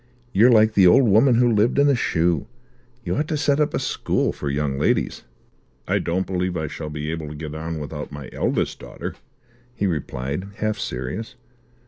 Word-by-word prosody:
"You're 115 +6 +6
like 110 -2 +5
the 95 -3 +6
old 120 +8 +6
woman 115 +5 +5
who 120 0 +4
lived 110 +5 +2
in 140 0 +5
a 140 - +4
shoe. 85 - +1 0.6
You - - -1
ought 150 +1 0
to 155 - -1
set 145 0 +2
up 150 - +2
a - - +1
school - - -1
for 70 - -4
young 70 -1 -1
ladies." - - 0 0.6
"I - - +2
don't 90 +3 -1
believe 90 -1 -2
I 80 - -2
shall 75 +1 -6
be 75 +1 -4
able 80 -2 -4
to 75 - -7
get 75 0 -6
on 80 +1 -4
without 75 0 -6
my 70 -2 -8
eldest - - -1
daughter," - - -7 0.6
he 100 - -1
replied, 75 0 -3
half 110 0 -2
serious. 65 - -4
90 Hz, 190 wpm, -23 LUFS, 75-110 Hz, 0.6 s, You're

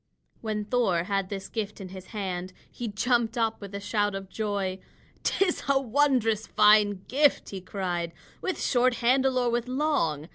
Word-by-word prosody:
When 215 -2 -2
Thor 205 -7 +1
had 195 0 -1
this 195 -1 -5
gift 210 -2 -4
in 190 -2 -7
his 190 0 -10
hand, 185 -4 -4 0.2
he 240 - -5
jumped 235 +2 +1
up 225 -1 0
with 200 0 -8
a - - -3
shout 205 0 0
of 195 -1 -6
joy. 200 -3 -2 0.4
"'Tis 375 -2 0
a 275 -1 +4
wondrous 245 -4 +2
fine 210 -2 +4
gift," 285 +2 +2
he 195 -2 -5
cried, 180 -3 -3 0.3
"with 375 - -2
short 250 -1 +2
handle 260 +2 +2
or 245 -1 +2
with 240 +1 -1
long. 255 - 0
215 Hz, 170 wpm, -27 LUFS, 195-245 Hz, 0.4 s, a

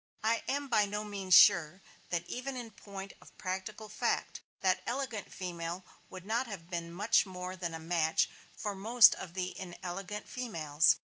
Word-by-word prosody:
I 230 +1 +2
am 285 +1 -1
by 215 -5 +3
no 210 +1 -3
means 195 -3 +2
sure 180 -2 +6 0.3
that 170 -1 -1
even 255 +7 -4
in 235 -2 -6
point 195 -2 -9
of - - -17
practical 190 +4 -4
fact - - -1 0.2
that 185 -1 +2
elegant 245 -4 -3
female 175 0 -5 0.2
would 185 -1 -9
not 235 +4 0
have 185 -5 -8
been 170 -1 -3 0.3
more 185 -1 -6
than 170 -3 -4
a - - -6
match 160 -1 +2 0.3
for 205 - -2
most 220 +4 +7
of 180 -2 -8
the 185 -1 -3
inelegant 185 +3 -6
females. 165 -11 +2
190 Hz, 165 wpm, -32 LUFS, 175-215 Hz, 0.3 s, most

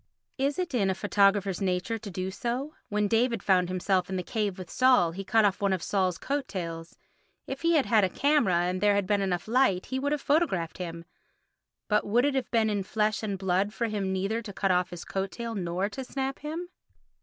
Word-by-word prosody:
Is 275 +1 0
it 360 -4 -2
in 200 -6 +2
photographer's 195 -1 +2
nature 190 +4 -1
to 210 -1 -8
do 185 0 -4
so? 250 +8 -3 0.2
When 210 0 +1
David 230 0 +1
found 180 -2 +3
himself 185 0 0
in 190 - -3
the 180 - -2
cave 205 -2 -2
with 185 -2 -7
Saul 255 -10 +4
he 195 +4 -6
cut 220 +2 +3
off 200 -1 +1
one 200 -1 +2
of 185 - -2
Saul's 185 -4 0
coattails; 175 -12 -4 0.5
if 270 +1 -6
he 335 0 +3
had 290 - +3
had 220 -3 +4
a 190 - +2
camera 280 - +2
and 180 +1 -1
there 205 -1 +4
had 200 -1 +1
been 205 +1 +1
enough 180 -2 -1
light 225 -6 +2
he 260 - -3
would 285 +2 -1
have 300 - +1
photographed 275 - 0
him; 170 -2 -6 0.8
but 210 -1 +2
would 235 +5 +2
it 290 - +1
have 265 -3 -1
been 225 -2 +2
in 205 -2 0
flesh 210 +1 0
and 205 -3 -3
blood 190 +2 0
for 235 - 0
him 200 -3 -2
neither 195 +5 -1
to 215 -3 -8
cut 195 0 0
off 180 0 +2
his 175 -2 -8
coat 195 0 -2
tail 235 +1 -5
nor 185 -1 -1
to 265 +5 -6
snap 270 +1 -3
him? 325 +4 -5
205 Hz, 220 wpm, -28 LUFS, 185-245 Hz, 0.8 s, Saul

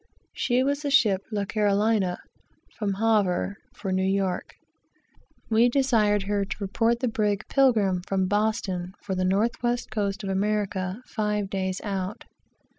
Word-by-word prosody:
She 250 +1 +1
was 285 +2 0
the 290 - -2
ship 210 -8 +4
La 205 -2 -1
Carolina, 205 -2 +1 0.6
from 200 -3 -2
Havre, 200 -3 +1 0.2
for 195 -6 -4
New 185 0 +1
York. 190 -1 -1 0.9
We 230 +2 +4
desired 225 -6 +2
her 200 0 0
to 195 - -5
report 230 +4 0
the 255 - +1
brig 210 -3 0
Pilgrim, 215 -9 +3
from 190 -1 +1
Boston, 195 -3 -1
for 195 - -3
the 185 0 -1
north 200 +6 +1
west 240 -1 -1
coast 205 -1 -2
of 195 - -3
America, 200 +1 -1
five 210 -3 -2
days 190 -1 -2
out. 195 +1 -4
205 Hz, 145 wpm, -26 LUFS, 190-225 Hz, 0.9 s, ship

